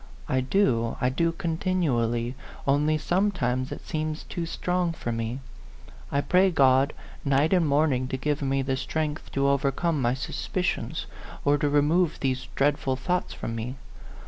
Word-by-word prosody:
I 130 - +1
do, 130 - +1
I 125 - +2
do 165 +6 +1
continually, 160 -10 0 0.3
only 150 +3 +3
sometimes 150 -8 0
it - - -7
seems 155 -1 -3
too 170 -3 -4
strong 180 0 -1
for 120 -7 -4
me. 115 +3 -3 0.7
I 140 - +2
pray 185 +5 +4
God 135 -4 +4 0.3
night 140 +4 +3
and 175 -4 +3
morning 140 -3 +2
to 130 - -2
give 150 +3 -1
me 135 -1 +1
the 135 0 -1
strength 155 +3 -3
to 140 0 +2
overcome 140 +3 +1
my 120 +1 +2
suspicions, 180 +6 -2 0.4
or 145 0 +4
to 145 0 +1
remove 150 +4 +2
these 130 -1 -1
dreadful 135 -1 +1
thoughts 175 +8 -1
from 115 - -4
me. 115 +3 -4
140 Hz, 150 wpm, -26 LUFS, 130-165 Hz, 0.7 s, pray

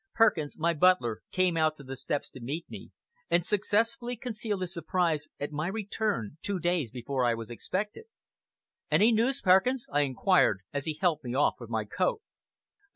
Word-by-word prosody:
Perkins, 170 -10 +2
my 170 +1 +2
butler, 155 -9 +3
came 185 -2 +2
out 155 -1 +2
to 140 - -13
the 135 0 -6
steps 145 +2 -2
to - - -10
meet 145 +8 -5
me, - - -9 0.4
and 170 0 +2
successfully 230 +4 +1
concealed 215 -4 -3
his 180 -1 -3
surprise 165 -2 0
at 145 +1 -3
my 150 +2 -2
return 200 - -2
two 200 -1 -1
days 175 -6 0
before 125 +2 -2
I 120 -1 +3
was 115 +1 -7
expected. 205 - -4 0.8
"Any 220 +3 +5
news, 235 +4 +1
Perkins?" 210 +8 +4
I 145 - +4
inquired, 140 - +3
as 140 -1 -2
he 155 - -2
helped 165 -5 +1
me 125 0 -4
off 145 - +2
with - - -9
my - - -1
coat. 455 -3 -1
170 Hz, 175 wpm, -29 LUFS, 145-210 Hz, 0.8 s, Any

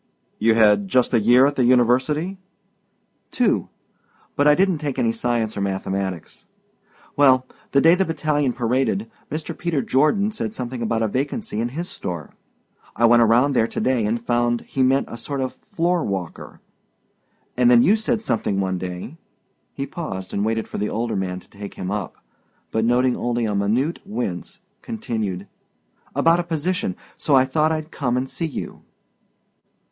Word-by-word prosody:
"You 110 +1 +3
had 105 -3 +4
just 125 +5 +2
a 115 - +5
year 120 +5 +5
at 145 +1 +1
the 130 - +3
university?" 130 +9 +2 0.9
"Two. - - +1 0.7
But 145 - +3
I 150 - +7
didn't 185 -2 +2
take 145 -3 -3
any 115 - +2
science 115 -1 -1
or 100 - -3
mathematics. 95 -2 -3 0.7
Well, 130 -3 +5 0.2
the 140 - +3
day 165 +3 +6
the 185 +2 +3
battalion 150 -5 0
paraded, 130 - -1 0.2
Mr. 155 +1 -4
Peter 160 -6 -1
Jordan 175 +10 +2
said 110 - -4
something 125 0 -5
about 115 0 0
a - - +2
vacancy 140 - -2
in 120 - -1
his 175 +1 -3
store. 85 - -6 0.6
I 120 - +3
went 120 0 +6
around 120 +5 +4
there 115 -3 +3
to - - -4
day 130 -3 +1
and 115 +2 0
I - - -12
found 120 0 +1
he 135 - -3
meant 135 +1 +3
a 115 - -8
sort 140 +4 -4
of 130 -1 -2
floor 175 -4 -1
walker 95 -4 -5 0.9
and 125 -1 +4
then 120 -1 +6
you 205 - +5
said 220 +1 -1
something 105 - -1
one 95 -1 -1
day" 90 - -6 0.5
he 135 - -4
paused 125 - -6
and 100 - 0
waited 110 +1 -1
for - - -6
the 105 - -1
older 115 +1 -2
man 90 -1 -2
to - - -19
take 100 0 -9
him 95 +1 -4
up, 105 -4 -4 0.6
but 110 - 0
noting 125 +2 +3
only 120 -1 -1
a 105 - -1
minute 110 +11 0
wince 120 - -5 0.2
continued 110 - -4 0.7
"about 165 +1 +4
a - - 0
position, 180 +5 -2 0.2
so 145 - +2
I 130 0 +5
thought 155 +4 +1
I'd 155 0 -3
come 125 -6 -1
and 130 +1 -1
see 165 +4 -3
you." 150 - -7
125 Hz, 175 wpm, -22 LUFS, 110-155 Hz, 0.9 s, I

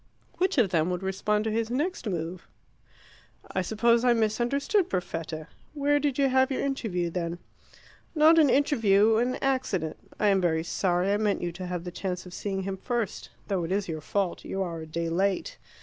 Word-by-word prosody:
Which 370 -3 +1
of 220 -8 +3
them 165 0 +2
would 180 +1 -3
respond 210 +2 0
to 220 - -1
his 225 +1 -1
next 290 +2 -2
move? 175 -1 -4 1.0
"I 185 - 0
suppose 230 +5 +2
I 245 -1 +5
misunderstood 240 - +1
Perfetta. 165 -3 -4 0.3
Where 290 0 +2
did 285 -2 -1
you 280 -1 +4
have 260 0 +3
your 265 - -1
interview, 205 -11 -1
then?" 170 -1 -3 0.8
"Not 320 +2 +6
an 300 -3 +5
interview 225 -6 +4
an 245 +2 +1
accident 255 - 0 0.2
I 210 - +3
am 195 -1 +3
very 160 -2 +1
sorry 180 +2 +1
I - - +2
meant 210 -3 0
you 175 - -1
to 180 +2 -7
have 180 -1 -3
the 180 - -6
chance 180 0 -4
of 180 - -11
seeing 195 -1 -3
him 195 0 -3
first. 235 0 -3 0.2
Though 190 -4 0
it 165 - -4
is 200 +1 0
your 160 -2 -4
fault. 195 +3 -2
You 195 0 -2
are 170 -3 -5
a 160 - -8
day 165 +2 -3
late. 190 +3 -1
200 Hz, 195 wpm, -27 LUFS, 175-245 Hz, 1.0 s, Not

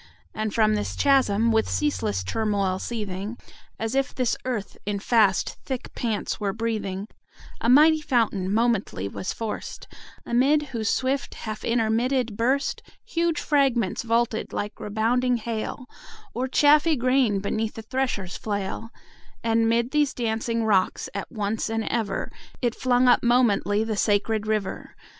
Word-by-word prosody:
And 215 0 -2
from 215 0 +3
this 210 -1 -2
chasm, 235 -5 +3
with 220 0 +2
ceaseless 105 - -1
turmoil 200 - 0
seething, 210 -1 -4 0.4
As 225 +1 -3
if 270 +1 0
this 250 -3 +1
earth 235 -6 -3
in 205 0 -2
fast 210 -2 +2
thick 260 -2 -5
pants 225 -2 -2
were 200 -2 -1
breathing, 215 -3 -3 0.5
A 230 - 0
mighty 310 +4 +6
fountain 220 -9 0
momently 215 - 0
was 185 - -4
forced; 225 -2 -5 0.4
Amid 275 +5 +2
whose 225 -5 -2
swift 265 +2 -1
half 215 -1 -6
intermitted 235 +1 +1
burst 260 +5 0
20 - - -24
Huge 335 -2 0
fragments 265 -9 +1
vaulted 230 -1 0
like 205 - -4
rebounding 240 +4 +1
hail, 230 +3 -4 0.5
Or 255 +2 -1
chaffy 300 +4 +4
grain 255 -5 +2
beneath 215 +2 -2
the 225 - -7
thresher's 225 -7 -2
flail: 205 +1 -4 0.5
And 225 0 +2
'mid 235 +2 +1
these 295 -2 +1
dancing 230 0 -1
rocks 195 -4 +1
at 200 - -5
once 215 -1 -2
and 225 0 -1
ever 215 -3 -2 0.3
It 240 -2 0
flung 250 0 +2
up 245 - +5
momently 220 -4 +3
the 220 -1 -2
sacred 210 +1 +1
river. 215 -3 -2
225 Hz, 145 wpm, -25 LUFS, 210-255 Hz, 0.5 s, mighty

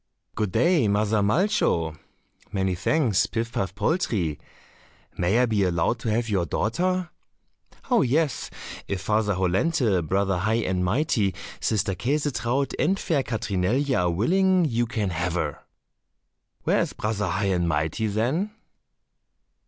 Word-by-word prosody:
"Good 105 -2 -2
day, 165 - +3
Mother 105 +1 +2
Malcho." 100 - +1 0.6
"Many 95 -2 0
thanks, 110 - +1
Pif 115 0 -3
paf 95 -4 -2
poltrie." 100 - 0 0.8
"May 90 +5 +1
I 125 - +4
be 110 -4 0
allowed 90 +5 +1
to 115 - -3
have 115 +2 0
your 95 -6 0
daughter?" 180 - -1 0.8
"Oh, 240 -3 +5
yes, 145 +2 0 0.4
if 100 - -2
Father 105 0 +1
Hollenthe, 95 - +1
Brother 95 -1 +1
High 110 +4 +1
and 90 -1 0
Mighty, 105 - +1 0.2
Sister 100 -2 0
Käsetraut, 135 - -1
and 190 +5 +2
fair 155 -7 0
Katrinelje 115 +4 0
are 90 -4 +2
willing, 180 - +3
you 120 -4 0
can 110 -5 -2
have 90 0 -2
her." 80 -5 -2 1.0
"Where - - +2
is - - -2
Brother 105 -2 -2
High 95 +2 0
and 85 -1 0
Mighty, 80 +8 0
then?" 135 - -1
110 Hz, 135 wpm, -25 LUFS, 95-135 Hz, 1.0 s, Oh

